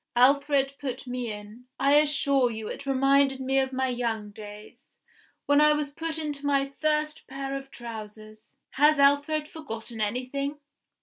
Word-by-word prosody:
Alfred 275 +2 +4
put 260 -3 -5
me 250 -2 -3
in. 210 +4 -10
I 280 +1 +3
assure 280 -3 +3
you 220 -2 -5
it 280 - -7
reminded 275 0 +3
me 265 +1 +1
of 265 0 0
my 260 0 0
young 230 -4 -2
days, 210 0 -12 0.5
when 285 +1 +4
I 300 0 +6
was 300 -1 -2
put 325 +1 -4
into 295 -3 -4
my 275 -1 +1
first 305 0 0
pair 270 +1 -5
of 270 0 -7
trousers. 215 -3 -10 0.2
Has 295 +2 +4
Alfred 285 +2 +3
forgotten 230 -8 -7
anything? 255 +6 -2
270 Hz, 150 wpm, -27 LUFS, 240-285 Hz, 0.5 s, I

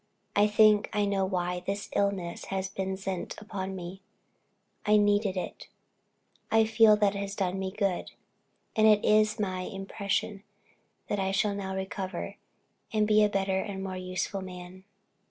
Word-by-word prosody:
I 205 +1 +5
think 210 0 +5
I 205 0 +2
know 200 -1 +1
why 180 -1 -1
this 200 +3 -4
illness 195 -4 -1
has 190 0 -3
been 190 0 -3
sent 190 -2 -4
upon 195 -2 -5
me 185 +1 -7 0.8
I 210 0 +4
needed 205 -1 +2
it 180 - -5 0.8
I 225 0 +4
feel 220 -1 +6
that 205 -1 +3
it 200 - -4
has 200 0 -4
done 190 -1 -1
me 190 0 -2
good 195 -2 -1 0.7
and 220 0 +5
it 210 -1 +5
is 215 +1 +4
my 185 -3 -1
impression, 195 +1 -3 0.7
that 205 - -1
I 190 0 0
shall 205 +1 +1
now 190 -1 -4
recover, 190 0 -4 0.5
and 215 -1 +2
be 215 0 +5
a 210 - +4
better 195 -1 0
and 195 -1 -4
more 190 -1 -4
useful 185 +1 -3
man." 185 0 -9
195 Hz, 160 wpm, -29 LUFS, 190-210 Hz, 0.8 s, feel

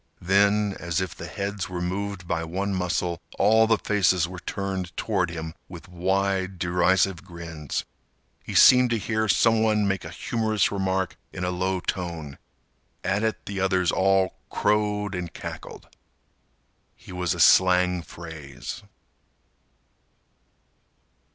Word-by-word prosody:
Then, 100 +2 +3
as 85 0 -1
if 95 -3 -3
the - - -8
heads 100 -1 -4
were 90 -1 -4
moved 95 +1 -3
by 80 -1 -1
one 95 +5 -2
muscle, 90 -2 -1 0.2
all 110 +2 +5
the 110 -1 +3
faces 95 -5 +2
were 90 0 -8
turned 95 -3 -4
toward 95 -6 0
him 80 -1 -6 0.2
with 90 -1 -10
wide, 95 +1 -1
derisive 90 +1 +2
grins. 85 -4 -5 0.6
He - - -7
seemed 125 -1 +7
to 115 - +1
hear 110 +1 -1
some 115 +1 +4
one 105 -2 +2
make 95 -2 -1
a - - -7
humorous 110 -3 0
remark 95 -2 -1
in 90 - -6
a 90 - 0
low 95 +1 -1
tone. 85 -8 -4 0.6
At 100 +2 0
it 110 -1 -2
the 100 -1 -4
others 95 -2 +2
all 95 0 +2
crowed 105 -1 0
and 90 -2 -4
cackled. - - -8 1.1
He - - -14
was 90 -2 -1
a - - -8
slang 90 -1 +5
phrase. 75 -4 -9
95 Hz, 135 wpm, -25 LUFS, 85-100 Hz, 1.1 s, seemed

